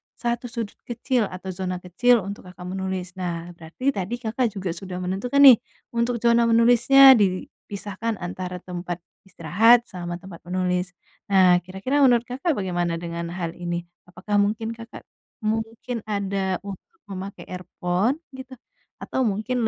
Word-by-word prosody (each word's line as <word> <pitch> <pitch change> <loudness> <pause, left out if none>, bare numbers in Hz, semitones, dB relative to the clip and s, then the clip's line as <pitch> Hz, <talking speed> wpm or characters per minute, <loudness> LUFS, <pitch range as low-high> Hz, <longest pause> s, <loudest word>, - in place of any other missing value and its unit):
satu 240 0 -2
sudut 230 -4 -6
kecil 240 -1 0
atau 185 +1 -7
zona 185 0 -3
kecil 230 +6 +2
untuk 200 0 -7
Kakak 180 0 -11
menulis. 190 -1 -3
Nah, 170 -1 -4
berarti 170 +12 -2
tadi 195 +4 -2
Kakak 235 +1 0
juga 190 -4 -4
sudah 185 -2 -6
menentukan, 195 +9 -1
nih, 260 -5 +10 0.3
untuk 235 +1 0
zona 235 0 +4
menulisnya 240 +4 +7
dipisahkan, 205 +3 -3
antara 180 0 -5
tempat 175 -1 -6 0.2
istirahat, 210 +8 +4
sama 175 -1 -5
tempat 175 -1 -11
menulis. 180 0 -1 0.3
Nah, 185 -2 +5
kira-kira, 190 - -2
menurut 245 -4 +5
Kakak, 270 +7 -2
bagaimana 175 -4 -1
dengan 170 0 -5
hal 170 -1 -4
ini? 175 -1 -3 0.2
Apakah 190 +4 -1
mungkin 215 +2 0
Kakak 230 0 -10 0.4
mungkin 225 +2 -2
ada 195 -2 -2
untuk 200 - -10 0.2
memakai 195 +1 -7
earphone, 180 - -1 0.2
gitu? 260 -1 -10 0.5
Atau 260 -2 0
mungkin 220 +3 -1
195 Hz, 140 wpm, -24 LUFS, 180-235 Hz, 0.5 s, nih